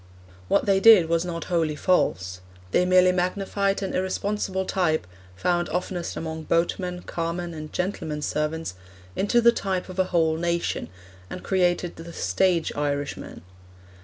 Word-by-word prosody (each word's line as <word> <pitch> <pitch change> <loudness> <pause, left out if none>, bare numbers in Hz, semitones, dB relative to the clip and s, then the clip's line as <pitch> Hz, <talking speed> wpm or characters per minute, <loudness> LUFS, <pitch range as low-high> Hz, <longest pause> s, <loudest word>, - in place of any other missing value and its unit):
What - - +2
they 195 -1 +3
did 195 -6 +7
was 165 0 +2
not 170 -2 -4
wholly 165 -4 0
false; 95 - 0 0.3
they 180 - +3
merely 185 0 +6
magnified 195 +2 0
an 190 - -3
irresponsible 190 0 -1
type, 170 - 0 0.3
found 175 - 0
oftenest 180 0 -3
among 160 -1 -5
boatmen, 180 +1 0
carmen, 170 +1 -3
and 155 -1 -8
gentlemen's 160 -5 -3
servants, 150 - -2 0.4
into 240 +4 +2
the 235 0 +7
type 190 -5 -2
of 185 +1 -7
a 185 - +4
whole 160 -3 +1
nation, 170 0 -1 0.4
and 180 - -7
created 180 -2 +1
the 165 +1 -9
stage 180 -3 +1
Irishman. 145 -9 -3
175 Hz, 140 wpm, -25 LUFS, 160-185 Hz, 0.4 s, did